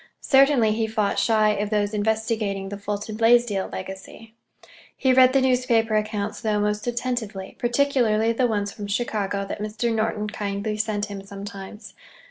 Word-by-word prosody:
Certainly 270 -5 +5
he 220 +1 0
fought 215 -2 0
shy 215 -2 +3
of 205 0 -2
those 210 -1 0
investigating 215 -2 -1
the 205 - -6
Fulton 205 +1 -4
Blaisdell 230 -3 +3
legacy. 190 +4 -9 0.6
He 260 -1 +3
read 255 0 +6
the 270 0 +3
newspaper 245 -4 +2
accounts, 210 -1 -2
though, 215 -2 0
most 210 +2 -1
attentively, 235 -5 -3
particularly 240 -3 +2
the 245 +2 +2
ones 205 -3 -1
from 205 -1 -7
Chicago 200 -2 -2
that 200 - -6
Mr. 220 +2 -2
Norton 220 -1 -1
kindly 210 0 -3
sent 210 -1 -1
him 200 -2 -8
sometimes. 200 +2 -9
215 Hz, 150 wpm, -24 LUFS, 205-230 Hz, 0.6 s, read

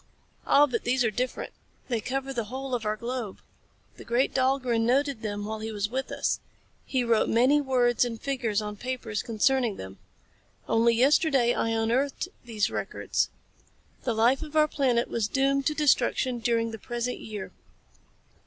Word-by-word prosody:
"Ah, 290 - +6
but 245 -5 -3
these 245 0 +2
are 225 - +1
different. 250 +4 -3 0.3
They 235 -4 -1
cover 270 +3 -3
the 235 -3 -2
whole 260 +4 -5
of 230 -3 -1
our 210 - +1
globe. 235 -3 -4 0.6
The - - -10
great 240 +3 +1
Dahlgren 255 -3 +1
noted 265 +1 +1
them 205 -1 -3
while 220 +1 -4
he 220 +1 -4
was 210 0 -2
with 265 +1 -3
us. - - 0 0.5
He 260 -2 0
wrote 230 -2 +2
many 260 +6 +4
words 250 -3 +2
and 230 -2 -3
figures 235 -6 -1
on 210 0 -5
paper 250 -1 -5
concerning 235 0 +1
them. 95 - -9 0.7
Only 230 +1 +3
yesterday 270 -1 +4
I 225 - 0
unearthed 240 +9 0
these 225 -3 -1
records. - - -1 0.7
The 240 -3 -1
life 240 +4 +3
of 310 -1 -8
our 305 0 +5
planet 255 -5 +1
was 225 -3 -1
doomed 275 +2 +1
to 305 - 0
destruction 260 -4 +2
during 230 0 0
the 225 - -7
present 240 +1 -3
year. 210 -3 -7
240 Hz, 165 wpm, -27 LUFS, 225-265 Hz, 0.7 s, Ah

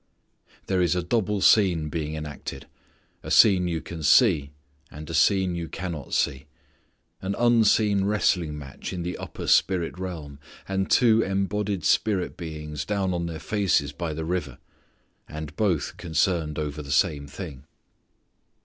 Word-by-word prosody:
There 95 -1 +1
is 90 0 +2
a 90 - -1
double 105 +1 0
scene 90 -9 +4
being 80 -1 -3
enacted. 75 -2 -7 0.6
A - - -8
scene 95 -5 +5
you 85 -2 -2
can 85 -2 -8
see, 75 - +4 0.4
and 75 +1 -10
a 85 - -6
scene 95 +3 +3
you 85 -1 -4
cannot 85 -5 -5
see. 70 +1 0 0.7
An 95 +1 -2
unseen 110 -4 +3
wrestling 90 -7 +1
match 70 -2 -8
in 90 -2 -4
the 90 +1 -3
upper - - -7
spirit 90 -1 +2
realm, 80 -7 -6 0.3
and 95 0 -1
two 115 -3 +5
embodied 100 0 -1
spirit 100 -4 +1
beings 75 -3 -6
down 95 +1 -1
on 85 -1 -2
their 80 -1 -5
faces 95 -6 0
by 80 +2 -4
the 80 +1 -4
river. 80 -7 -3 0.7
And 75 -1 -7
both 90 -9 0
concerned 80 -1 0
over 75 0 -3
the 70 - -10
same 75 -1 +1
thing. 75 -5 -9
85 Hz, 150 wpm, -25 LUFS, 75-95 Hz, 0.7 s, scene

